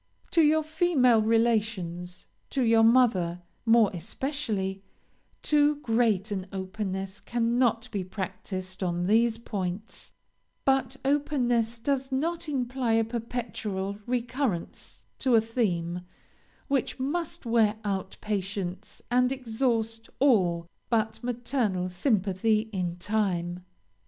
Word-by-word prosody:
"To 335 - +5
your 310 0 +4
female 305 -8 +3
relations 215 -6 0 0.2
to 270 - 0
your 225 -1 +5
mother, 220 -8 +4 0.2
more 225 -2 +6
especially, 200 - -2 0.6
too 295 0 +4
great 225 -6 +1
an 190 -2 -3
openness 190 0 -4
cannot 235 0 +1
be 200 -3 -2
practiced 185 0 -5
on 175 -1 0
these 225 +3 +3
points, 200 -2 -5 0.5
but 270 0 +2
openness 245 -5 +1
does 265 +2 -1
not 325 +4 -1
imply 255 -3 0
a 225 0 +4
perpetual 220 -4 -4
recurrence 245 -5 -2 0.2
to 255 -3 +3
a - - +8
theme, 180 -7 -1 0.7
which 275 -1 0
must 335 +4 -2
wear 225 -2 +3
out 195 -2 -2
patience 195 -3 -4
and 250 +1 +3
exhaust 225 -3 -1
all 185 -11 +3 0.2
but 225 0 0
maternal 235 -6 -1
sympathy, 210 +2 +1
in 180 -3 -1
time. 180 -3 -1
225 Hz, 105 wpm, -28 LUFS, 190-250 Hz, 0.7 s, a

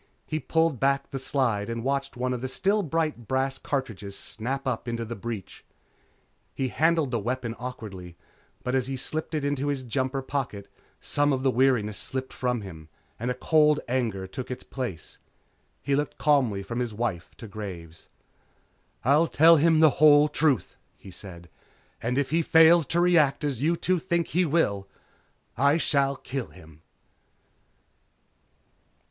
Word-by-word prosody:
He 155 - -2
pulled 160 -4 +1
back 140 0 +1
the 135 - -3
slide 120 -6 0
and 115 0 -4
watched 135 0 -2
one 125 +1 -1
of 125 - -4
the 130 - -2
still 200 +10 +1
bright 155 - -2
brass 135 +2 -1
cartridges 105 -8 -4
snap 130 +5 -5
up 125 -1 -2
into 115 -1 -3
the 120 +1 -6
breech. 110 -3 -7 0.9
He 130 -1 -1
handled 160 -1 +2
the 120 - 0
weapon 120 +1 -3
awkwardly, 100 -9 -8 0.5
but 125 - -2
as 130 -1 +1
he 135 0 -3
slipped 155 +4 -3
it 150 -2 -1
into 145 0 -1
his 140 -2 -2
jumper 130 +2 -2
pocket 130 -8 -4 0.3
some 145 0 +1
of 130 -1 -1
the 135 - +3
weariness 120 -5 +2
slipped 130 0 -4
from 125 -2 -1
him 80 -6 -10 0.3
and 120 +3 -2
a 125 - -1
cold 150 +2 +3
anger 115 -6 -1
took 125 +7 -7
its 125 - -6
place. 120 - -6 0.6
He 140 - +1
looked 145 +1 -2
calmly 130 -10 +2
from 115 +5 -4
his 120 -4 -3
wife 100 -7 -3
to 115 - -9
Graves. 90 -6 -8 1.0
"I'll 150 +6 +4
tell 165 +2 +6
him 160 +1 +4
the 155 -2 +7
whole 150 -1 +7
truth," 150 -5 0 0.2
he 95 - -12
said, 85 -2 -10 0.5
"And 125 +3 -1
if 140 -1 0
he 165 +1 +3
fails 165 0 +6
to 170 - 0
react 170 -6 +3
as 140 -5 -2
you 165 +3 +2
two 185 +1 +1
think 170 -1 -1
he 180 +3 +2
will, 105 -12 0 0.7
I 140 +5 +3
shall 140 -4 +1
kill 130 -1 -5
him." 80 -3 -16
130 Hz, 165 wpm, -26 LUFS, 115-150 Hz, 1.0 s, the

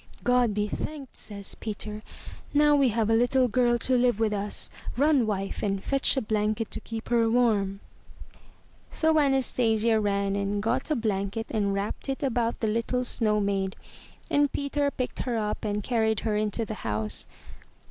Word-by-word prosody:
"God 245 -4 +2
be 210 0 0
thanked," 280 +5 -6
says 200 -2 -4
Peter. 210 0 -5 0.5
"Now 295 0 +5
we 275 -3 +4
have 225 -1 0
a 225 - +2
little 250 +2 +3
girl 240 0 +2
to 255 +2 +1
live 245 -3 +2
with 220 -2 +1
us! 205 0 0 0.3
Run, 280 -4 +3
wife, 195 -2 -3
and 195 -2 -1
fetch 275 0 +2
a - - +2
blanket 215 +1 -1
to - - -3
keep 225 -1 -7
her 230 -1 +3
warm." 210 -5 +1 1.1
So 315 -1 +2
Anastasia 235 -5 +2
ran 200 -1 0
and 200 0 -1
got 245 +6 0
a 305 - +2
blanket 210 -2 -2
and 205 -3 0
wrapped 200 +7 -3
it 270 +1 -3
about 240 -3 0
the 220 - +1
little 230 +3 0
snow 215 -3 +1
maid, 195 -2 -1 0.6
and 290 -1 +3
Peter 285 0 -1
picked 255 -3 -4
her 245 -3 -1
up 210 -1 -2
and 210 -1 -2
carried 220 -3 +1
her 215 -2 -1
into 215 +2 0
the 215 - -5
house. 105 0 0
225 Hz, 170 wpm, -27 LUFS, 210-250 Hz, 1.1 s, Now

